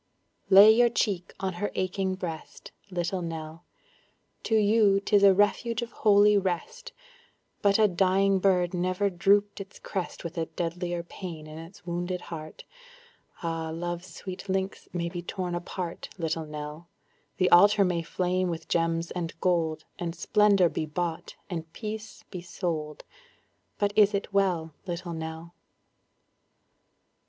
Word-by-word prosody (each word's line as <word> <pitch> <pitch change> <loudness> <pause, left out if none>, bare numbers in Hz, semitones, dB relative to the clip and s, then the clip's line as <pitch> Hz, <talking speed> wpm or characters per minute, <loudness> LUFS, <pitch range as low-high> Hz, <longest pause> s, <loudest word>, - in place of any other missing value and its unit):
Lay 200 +2 +10
your 240 +2 +5
cheek 200 -6 -1
on 190 -1 -2
her 205 - -1
aching 190 0 -1
breast, 165 -4 -7 0.2
Little 180 0 -2
Nell; 165 0 -6 0.8
To 225 - +1
you 210 -2 +4
'tis 200 0 +3
a 200 -1 +8
refuge 210 +4 +1
of 235 - -8
holy 205 -1 +5
rest, 195 - -4 0.7
But 200 -1 +4
a 215 -1 +5
dying 190 +1 +2
bird 180 -2 +2
never 185 +3 0
drooped 200 +3 +2
its 195 +1 -11
crest 190 -3 -5
With 170 0 -5
a 160 - -1
deadlier 175 0 -3
pain 170 -3 -8
in 155 +1 -9
its 165 +3 -12
wounded 175 +1 -2
heart; 155 -3 -8 0.8
Ah! 165 -1 -2
love's 175 +2 -4
sweet 185 +3 -8
links 190 +1 -2
may 170 -1 -2
be 175 0 -5
torn 180 0 -4
apart, 175 0 -5
Little 160 -2 -2
Nell; 150 +2 -7 0.5
The 185 - +2
altar 200 +3 +7
may 175 -2 0
flame 180 +2 -1
with 165 -1 -5
gems 165 0 0
and 170 -2 -5
gold, 160 -3 0
And 170 -1 -3
splendor 205 -4 +4
be 155 -1 -3
bought, 165 +1 -4
and 165 -4 -5
peace 215 -1 -7
be 180 -3 -6
sold, 165 -4 -4 0.7
But 205 0 0
is 210 -1 +5
it 200 0 -4
well, 180 -5 +1
Little 175 0 -4
Nell? 160 +1 -6
180 Hz, 145 wpm, -27 LUFS, 165-200 Hz, 0.8 s, Lay